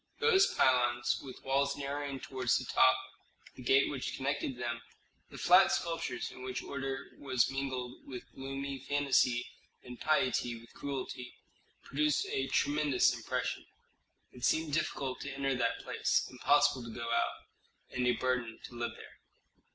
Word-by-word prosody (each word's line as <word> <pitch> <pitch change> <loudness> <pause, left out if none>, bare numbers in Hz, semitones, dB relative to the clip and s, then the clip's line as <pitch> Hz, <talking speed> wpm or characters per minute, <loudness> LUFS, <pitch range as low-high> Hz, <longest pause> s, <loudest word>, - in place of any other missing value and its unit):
Those 395 -4 +5
pylons 120 -2 +2
with 130 -2 -10
walls 140 +1 +1
narrowing 140 -1 -3
toward 130 -1 -6
the 130 - +3
top, 130 0 +6 0.6
the - - -12
gate 135 +2 +4
which 135 -3 -3
connected 135 -1 -2
them, 120 -1 -3 0.5
the - - -10
flat 180 +2 +6
sculptures 165 -7 -2
in - - -11
which 130 0 -4
order 135 -1 -4
was 130 -3 +1
mingled 130 -2 -4
with 125 -3 -6
gloomy 135 0 -5
fantasy 135 -3 +2 0.4
and 125 -1 -10
piety 130 -6 +1
with 115 0 -17
cruelty, 130 -3 -5 0.5
produced 150 +1 +1
a 135 0 0
tremendous 145 -3 +3
impression. - - -3 0.6
It 125 - -13
seemed 160 0 +2
difficult 135 -4 -1
to 140 - -4
enter 135 0 0
that 120 -2 0
place, - - +1
impossible 130 +1 +3
to 120 - -8
go 115 -1 -3
out, 115 - +1 0.6
and 125 -1 +1
a 125 - +4
burden 125 -3 -1
to - - -9
live 120 -1 -3
there. - - -13
130 Hz, 150 wpm, -32 LUFS, 125-140 Hz, 0.6 s, top